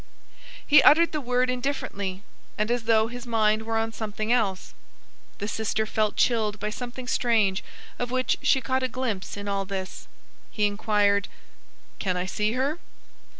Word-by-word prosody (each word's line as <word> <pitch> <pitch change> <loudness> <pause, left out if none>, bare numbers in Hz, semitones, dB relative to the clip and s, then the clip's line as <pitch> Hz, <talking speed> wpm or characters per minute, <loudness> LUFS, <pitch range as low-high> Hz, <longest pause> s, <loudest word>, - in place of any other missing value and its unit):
He 300 - +7
uttered 330 +3 +6
the 305 - -2
word 250 0 +1
indifferently, 205 -7 -3 0.3
and 210 +2 0
as 240 -2 -1
though 220 -1 +4
his 245 +1 -7
mind 215 -2 +2
were 225 0 0
on 225 0 -1
something 215 +1 -2
else. 200 -6 -1 0.6
The 205 - -4
sister 220 0 -1
felt 215 -1 0
chilled 215 -3 +1
by 210 +1 -3
something 245 +2 -7
strange 220 -7 +2 0.4
of 245 - -2
which 255 +1 0
she 265 - +3
caught 260 +1 0
a 255 - +1
glimpse 225 -7 -4
in 205 0 -6
all 200 -1 -1
this. 190 -1 -6 0.4
He 210 - 0
inquired:— 205 -1 +2 0.7
"Can 185 -2 -1
I 180 - -1
see 210 +3 -1
her?" 275 +6 -1
220 Hz, 160 wpm, -26 LUFS, 205-245 Hz, 0.7 s, He